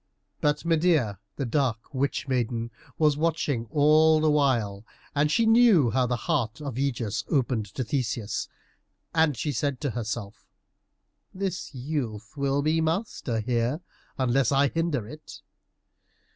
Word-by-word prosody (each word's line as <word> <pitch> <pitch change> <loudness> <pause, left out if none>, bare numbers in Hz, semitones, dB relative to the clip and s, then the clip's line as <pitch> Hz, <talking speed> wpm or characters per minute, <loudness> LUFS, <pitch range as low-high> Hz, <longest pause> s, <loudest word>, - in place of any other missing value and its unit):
But 150 +2 0
Medeia, 160 - +2 0.2
the 140 - -2
dark 120 -1 -1
witch 140 +1 -1
maiden, 120 -2 -1 0.3
was 150 -2 +3
watching 150 -7 0
all 155 +3 +5
the 155 0 +3
while, 120 -9 +1 0.3
and 150 +1 +2
she 230 - +3
saw 225 - +5
how 130 -1 +2
the 125 - 0
heart 130 -8 0
of 140 -3 -5
Ægeus 120 -5 -2
opened 125 -7 0
to 130 - -1
Theseus, 115 -3 -2 0.6
and 160 -5 +3
she 150 - -1
said 140 +1 -1
to 145 -4 -1
herself, 110 -2 -5 0.9
"This 185 -6 -4
youth 125 -5 -4
will 140 0 0
be 160 +2 +2
master 160 - -1
here, 120 +7 -1 0.4
unless 130 0 +2
I 140 0 +3
hinder 160 -9 -1
it." 155 +5 -11
140 Hz, 135 wpm, -26 LUFS, 120-155 Hz, 0.9 s, all